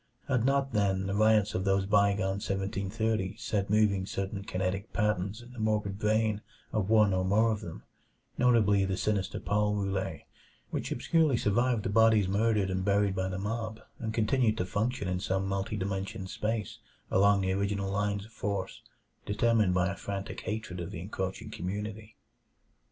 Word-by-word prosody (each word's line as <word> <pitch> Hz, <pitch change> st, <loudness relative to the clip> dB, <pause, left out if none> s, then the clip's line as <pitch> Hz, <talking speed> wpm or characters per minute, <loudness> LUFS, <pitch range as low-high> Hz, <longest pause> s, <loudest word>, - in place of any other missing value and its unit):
Had 125 Hz, -4 st, +1 dB
not, 135 Hz, -1 st, +1 dB
then, 95 Hz, -2 st, +1 dB
the 100 Hz, -, -2 dB
riots 110 Hz, 0 st, +3 dB
of 95 Hz, -, -1 dB
those 95 Hz, 0 st, +2 dB
bygone 100 Hz, -1 st, +2 dB
seventeen 100 Hz, -1 st, -2 dB
thirties 110 Hz, -1 st, -1 dB
set 100 Hz, -2 st, -1 dB
moving 100 Hz, -3 st, +2 dB
certain 100 Hz, 0 st, -3 dB
kinetic 95 Hz, 0 st, -2 dB
patterns 105 Hz, +1 st, -1 dB
in 120 Hz, +1 st, -14 dB
the 125 Hz, -, -9 dB
morbid 105 Hz, -2 st, 0 dB
brain 110 Hz, 0 st, +1 dB, 0.3 s
of 105 Hz, -3 st, 0 dB
one 105 Hz, -3 st, +5 dB
or 95 Hz, 0 st, +1 dB
more 110 Hz, +4 st, +3 dB
of 105 Hz, -1 st, -2 dB
them 85 Hz, -5 st, -8 dB, 0.5 s
notably 110 Hz, -5 st, +4 dB
the 95 Hz, -1 st, -1 dB
sinister 100 Hz, -3 st, -1 dB
Paul 105 Hz, 0 st, +1 dB
Roulet 95 Hz, -1 st, -2 dB, 0.5 s
which -, -, -3 dB
obscurely 160 Hz, -6 st, +2 dB
survived 115 Hz, +2 st, +1 dB
the -, -, -1 dB
bodies 110 Hz, -1 st, +4 dB
murdered 105 Hz, -1 st, +1 dB
and 95 Hz, 0 st, -1 dB
buried 100 Hz, 0 st, +2 dB
by 95 Hz, 0 st, -1 dB
the 95 Hz, -1 st, -3 dB
mob, 110 Hz, +2 st, -3 dB, 0.2 s
and 110 Hz, -1 st, -3 dB
continued 110 Hz, 0 st, +2 dB
to 90 Hz, -, 0 dB
function 105 Hz, +3 st, -1 dB
in 90 Hz, 0 st, -1 dB
some 95 Hz, 0 st, -1 dB
multiple 100 Hz, +2 st, -2 dB
dimensioned 95 Hz, -1 st, -3 dB
space 110 Hz, -1 st, -3 dB, 0.3 s
along 100 Hz, +1 st, +4 dB
the 95 Hz, 0 st, 0 dB
original 100 Hz, 0 st, -1 dB
lines 100 Hz, 0 st, -1 dB
of 110 Hz, -, -16 dB
force 100 Hz, -3 st, -3 dB, 0.5 s
determined 105 Hz, -3 st, +2 dB
by 90 Hz, 0 st, +3 dB
a 100 Hz, -, -2 dB
frantic 100 Hz, 0 st, -5 dB
hatred 110 Hz, -4 st, -4 dB
of 85 Hz, 0 st, -4 dB
the 95 Hz, -4 st, -6 dB
encroaching 95 Hz, +1 st, -4 dB
community? 105 Hz, +4 st, -5 dB
100 Hz, 170 wpm, -30 LUFS, 95-110 Hz, 0.5 s, one